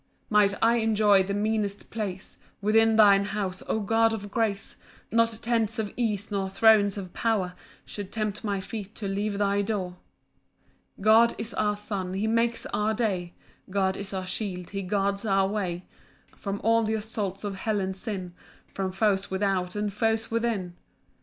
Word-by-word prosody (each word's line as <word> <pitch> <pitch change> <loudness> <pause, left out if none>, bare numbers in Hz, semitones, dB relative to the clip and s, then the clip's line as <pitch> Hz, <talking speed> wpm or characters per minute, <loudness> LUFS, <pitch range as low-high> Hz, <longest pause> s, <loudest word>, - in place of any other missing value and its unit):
2 - - -34
Might 205 -1 +5
I 230 +1 +5
enjoy 215 -3 +4
the 200 +1 -2
meanest 210 -1 -1
place 205 -4 -5 0.2
Within 220 +2 +4
thine 200 -2 +6
house, 195 -3 -3
O 220 - 0
God 225 +2 +2
of 205 -2 -5
grace, 210 -3 -1 0.3
Not 230 0 +2
tents 230 -2 +1
of 215 -2 -3
ease, 215 -4 -1
nor 195 -1 -1
thrones 205 0 +4
of 185 -3 -7
power, 205 -6 0 0.3
Should 205 -2 -7
tempt 215 -2 -3
my 200 -2 -1
feet 205 +1 -7
to 205 - -4
leave 200 +1 -1
thy 200 0 +2
door. 195 -4 -3 1.0
3 - - -12
God 225 +2 +6
is 220 +1 -4
our 210 -1 +1
sun, 195 -3 -3
he 200 +3 -1
makes 230 +1 +1
our 215 +1 +1
day; 190 -7 -1 0.3
God 190 -1 +1
is 200 0 -6
our 190 -1 -3
shield, 185 -2 -4
he 195 -1 -3
guards 200 +1 0
our 195 -3 +2
way 185 -4 -3 0.5
From 200 0 -4
all 230 +1 +4
th' 220 0 0
assaults 210 -3 -3
of 205 -1 -3
hell 210 +2 -1
and 190 0 -2
sin, 190 -4 -5 0.4
From 190 -1 -2
foes 195 0 +1
without, 190 -1 -1
and 210 -1 -2
foes 225 +2 0
within. 225 -6 -1
205 Hz, 170 wpm, -27 LUFS, 195-220 Hz, 1.0 s, thine